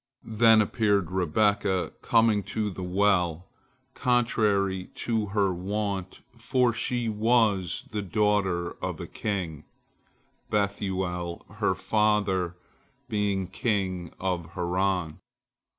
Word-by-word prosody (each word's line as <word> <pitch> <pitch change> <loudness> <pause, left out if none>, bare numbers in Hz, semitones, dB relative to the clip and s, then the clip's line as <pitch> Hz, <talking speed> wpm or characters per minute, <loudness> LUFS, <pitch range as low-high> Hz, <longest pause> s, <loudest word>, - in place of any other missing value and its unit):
Then 110 0 +6
appeared 100 -5 +1
Rebekah, 95 +2 +1
coming 115 -2 +3
to 105 -2 -2
the 95 - -7
well 90 -2 +1 0.5
contrary 105 -6 +1
to 110 -3 -1
her 100 -2 +1
wont, 95 0 -3 0.2
for 125 +1 +2
she 120 +1 -1
was 110 -5 +1
the 105 0 -2
daughter 100 -3 +1
of - - -3
a - - -5
king, 90 -8 -4 0.9
Bethuel 95 -4 -2
her 100 -3 +2
father 100 -4 +1 0.5
being 100 -2 0
king 95 -4 -2
of 85 -3 -3
Haran. 90 -2 -1
100 Hz, 100 wpm, -27 LUFS, 90-105 Hz, 0.9 s, Then